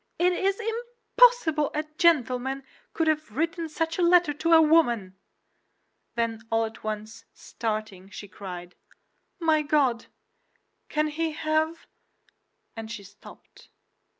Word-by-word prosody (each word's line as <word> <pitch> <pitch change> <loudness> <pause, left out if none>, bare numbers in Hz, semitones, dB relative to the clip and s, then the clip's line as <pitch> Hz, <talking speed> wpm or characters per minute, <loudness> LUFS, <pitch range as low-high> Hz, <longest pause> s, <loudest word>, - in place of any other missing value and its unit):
"It 360 +1 +3
is 390 +3 0
impossible 465 -7 +2
a 305 - 0 0.2
gentleman 270 -5 +2 0.3
could 325 - -1
have 305 -7 -1
written 330 +1 -1
such 325 +2 -2
a - - +2
letter 345 -3 +4
to 330 +3 +1
a 325 - +9
woman." 240 - +3 1.0
Then 230 -1 -1
all 225 0 +2
at 220 0 -10
once, 215 +1 -6
starting, 215 -4 -5
she 205 0 -9
cried, 180 -2 -9 0.7
"My 320 -2 +3
God! 285 -6 +1 0.8
can 305 0 +1
he 320 +1 -2
have—" 315 +2 -1 0.9
and 225 -1 -7
she 220 -3 -7
stopped. 205 +2 -16
300 Hz, 125 wpm, -26 LUFS, 225-330 Hz, 1.0 s, a